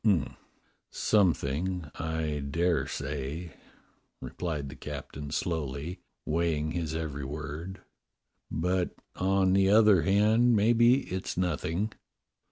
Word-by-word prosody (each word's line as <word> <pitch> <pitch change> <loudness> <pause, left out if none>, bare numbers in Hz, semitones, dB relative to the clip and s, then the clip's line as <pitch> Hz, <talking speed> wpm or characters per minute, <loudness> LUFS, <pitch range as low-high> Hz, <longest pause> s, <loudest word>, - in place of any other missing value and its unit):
^" 95 -10 +2 0.5
"Something, 90 -3 +1
I 80 -2 -2
dare 85 +5 0
say," 75 +4 -4 0.7
replied 75 -6 -4
the 75 - -9
captain 75 0 -7
slowly, 75 +1 -3 0.3
weighing 80 -1 0
his 80 -2 -2
every 75 -4 -3
word, 75 +6 -6 0.7
"but, 90 +3 0 0.2
on 95 0 +2
the 95 0 +4
other 105 -3 +6
hand, 110 +7 +4
maybe 120 +5 +5
it's 95 -5 -4
nothing. 90 +3 -1
85 Hz, 100 wpm, -29 LUFS, 75-95 Hz, 0.7 s, other